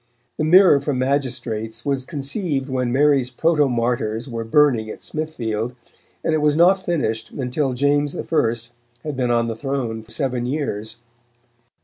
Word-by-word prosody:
The - - -1
Mirror 175 -2 +6
for 140 -1 -1
Magistrates 125 -4 -2
was 135 -2 -1
conceived 145 -1 -3
when 125 -2 -1
Mary's 135 -1 +3
protomartyrs 125 -6 0
were 115 -3 -4
burning 115 -2 +3
at - - -8
Smithfield, 125 -7 -3 0.5
and 160 - +1
it 155 - +1
was 150 -1 +3
not 185 +4 +4
finished 120 -11 -1
until 130 +1 -2
James 145 +2 +1
I. - - -3 0.8
had 150 -2 -4
been 125 -2 0
on 115 -1 +2
the 115 - -3
throne 120 -3 -3
seven 125 -4 -2
years. 115 -5 -3
135 Hz, 140 wpm, -21 LUFS, 120-150 Hz, 0.8 s, Mirror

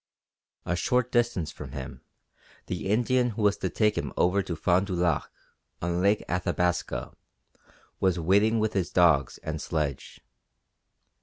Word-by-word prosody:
A 90 - 0
short 125 +6 +1
distance 120 -9 +1
from - - -9
him 65 -2 -7 0.6
the - - -4
Indian 125 +3 +2
who 110 - -1
was 105 -1 +3
to 95 - -2
take 105 +3 +1
him - - -3
over 95 +3 +3
to 90 -3 -4
Fond 90 +4 +2
du 95 - -2
Lac, 85 -4 0 0.5
on 85 +1 -1
Lake 100 +2 +2
Athabasca, 90 0 -1 0.9
was 95 -2 +2
waiting 100 +7 +3
with 110 0 0
his 95 -3 0
dogs 80 -7 +3
and 80 -1 -4
sledge. 75 -4 -3
90 Hz, 145 wpm, -27 LUFS, 85-105 Hz, 0.9 s, was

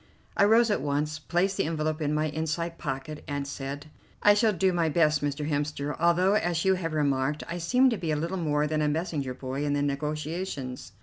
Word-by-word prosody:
I 200 - +5
rose 225 +2 +5
at 205 - +1
once, 150 +2 -1
placed 175 +5 0
the - - +1
envelope 155 0 -2
in 150 -1 0
my 155 +1 +1
inside 160 +2 -3
pocket, 145 +2 -5
and 145 -1 -3
said: 140 +2 -6 0.3
"I 205 - +8
shall 215 +1 +3
do 190 -1 +1
my 170 -2 +1
best, 155 -1 +3
Mr. 145 +1 -2
Hemster, 145 -1 -2
although, 170 +3 +3
as 175 -5 +1
you 190 - +5
have 170 -4 -3
remarked, 145 -1 0
I 175 +1 -4
seem 250 +10 +3
to 230 - -1
be 160 -4 -1
little 165 +5 -2
more 150 -3 +1
than 155 0 0
a 150 - +2
messenger 150 -4 -2
boy 130 +2 -4
in 145 -1 0
the 145 0 +1
negotiations." 150 - -4
155 Hz, 205 wpm, -27 LUFS, 145-170 Hz, 0.3 s, I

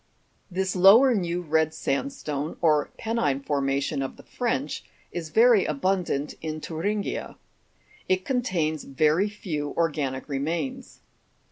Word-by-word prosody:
24. 180 - -15
This 190 -1 0
lower 215 +8 +7
new 175 -4 -1
red 160 0 +1
sandstone, 150 - -3
or 155 -3 +3
penine 150 - -1
formation 140 0 0
of 135 - -4
the - - -13
French, 155 - -2 0.3
is 170 -3 -5
very 230 +2 +5
abundant 155 -1 -1
in 155 -1 -4
Thuringia. 200 +7 -3 0.7
It 185 0 +1
contains 175 - 0
very 155 +8 +2
few 155 -8 -4
organic 145 -5 -1
remains. 145 +1 -3
160 Hz, 120 wpm, -26 LUFS, 145-195 Hz, 0.7 s, lower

